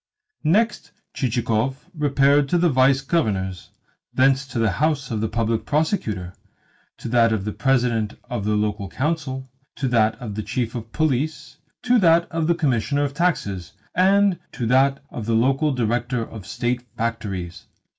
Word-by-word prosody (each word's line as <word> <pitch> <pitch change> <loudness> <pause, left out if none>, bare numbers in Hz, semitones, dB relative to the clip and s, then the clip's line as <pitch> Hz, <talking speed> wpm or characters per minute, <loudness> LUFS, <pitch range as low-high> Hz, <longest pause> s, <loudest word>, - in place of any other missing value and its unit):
Next, 185 0 +1 0.2
Chichikov 125 +3 -1
repaired 145 -2 +3
to 175 - +2
the 175 0 +3
Vice 135 0 +4
Governor's, 100 - -1 0.4
and - - -25
thence 135 +1 -3
to 135 - -6
the 115 -3 +2
house 150 -4 +1
of 110 -2 -1
the 110 - 0
Public 115 0 -1
Prosecutor, 130 - -1 0.6
to - - -7
that 115 -1 +4
of 105 -3 -1
the 105 - -2
President 120 -4 0
of 120 -5 -3
the 105 +1 +1
Local 105 -2 -1
Council, 135 - -2 0.3
to 135 - -2
that 110 -2 +3
of 115 -3 -7
the 110 - -3
Chief 115 +1 -2
of 115 -2 -7
Police, 150 0 -1 0.3
to 250 -1 +4
that 170 -2 +4
of 165 -1 -1
the 170 - +3
Commissioner 140 -1 +1
of 140 -1 -2
Taxes, 100 - -1 0.2
and 195 +1 +3
to 120 - -3
that 135 +3 +3
of 110 -2 -6
the 115 - +2
local 135 +6 +2
Director 120 -1 -1
of 105 -4 -10
State 120 0 -1 0.2
Factories. 100 -7 -4
125 Hz, 165 wpm, -22 LUFS, 110-150 Hz, 0.6 s, Vice